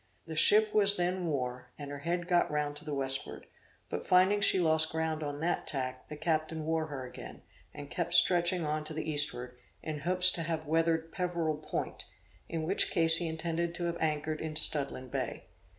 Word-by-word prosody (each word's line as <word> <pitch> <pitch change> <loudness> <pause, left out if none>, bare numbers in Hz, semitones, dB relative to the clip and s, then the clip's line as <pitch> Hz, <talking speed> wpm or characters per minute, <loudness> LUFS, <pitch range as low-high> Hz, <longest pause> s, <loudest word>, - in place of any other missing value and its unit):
The 160 - -7
ship 210 +7 +4
was 205 -1 +6
then 180 0 -1
wore, 125 -4 -4
and 145 -1 -8
her 145 - -7
head 175 +3 -3
got 175 -1 +2
round 150 -1 -2
to 150 - -10
the 150 - -5
westward; 135 -1 +1 0.4
but - - -5
finding 190 +3 +3
she 195 - +4
lost 160 -2 +3
ground 160 -1 -2
on 145 -1 -5
that 170 - -2
tack, 130 -2 -4
the 150 - -7
captain 160 0 -2
wore 160 0 -1
her 135 -4 -6
again, 125 - -11 0.3
and 145 -1 -9
kept 170 +3 0
stretching 175 -1 +4
on 155 0 -2
to 155 0 -7
the 155 0 -4
eastward, 125 -5 0 0.2
in 155 -1 -5
hopes 180 +4 +4
to 170 - -4
have 160 -1 -3
weathered 165 +1 0
Peverel 170 -4 -2
Point, 155 - -5 0.4
in 165 -1 -3
which 185 +5 +4
case 165 -2 +4
he 170 0 -2
intended 165 +1 -3
to 175 - -4
have 170 0 -2
anchored 155 0 -2
in 155 -1 -5
Studland 140 -4 +1
Bay. - - -4
160 Hz, 195 wpm, -30 LUFS, 150-170 Hz, 0.4 s, was